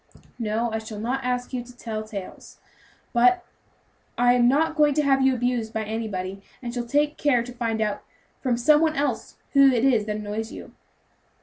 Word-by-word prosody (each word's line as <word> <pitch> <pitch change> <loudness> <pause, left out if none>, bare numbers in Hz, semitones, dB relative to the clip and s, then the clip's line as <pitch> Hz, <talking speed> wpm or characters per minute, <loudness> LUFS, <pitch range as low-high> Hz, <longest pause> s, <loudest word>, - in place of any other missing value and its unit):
"No, 225 +1 -1
I 220 - -1
shall 220 -1 -8
not 255 +5 -2
ask 250 0 -2
you 250 -1 -2
to 245 0 -16
tell 220 -3 -4
tales, 205 -4 -9 0.5
but 250 +10 +4 0.7
I 245 0 +5
am 245 -1 +4
not 310 +5 +2
going 295 -2 +3
to 300 - +2
have 270 -1 +3
you 265 -1 +4
abused 240 -2 -1
by 220 - -1
anybody, 200 -3 -4 0.2
and 240 -2 -6
shall 240 -1 -3
take 295 +3 +1
care 255 -5 +3
to 245 +1 -9
find 230 -2 -2
out 210 -1 -1 0.4
from 250 -3 0
some 295 +5 +4
one 315 -1 +2
else 280 -6 -2 0.2
who 275 -1 +7
it 245 0 +1
is 235 -6 +3
that 210 -1 -2
annoys 215 +1 -4
you." - - -10
240 Hz, 195 wpm, -24 LUFS, 220-270 Hz, 0.7 s, who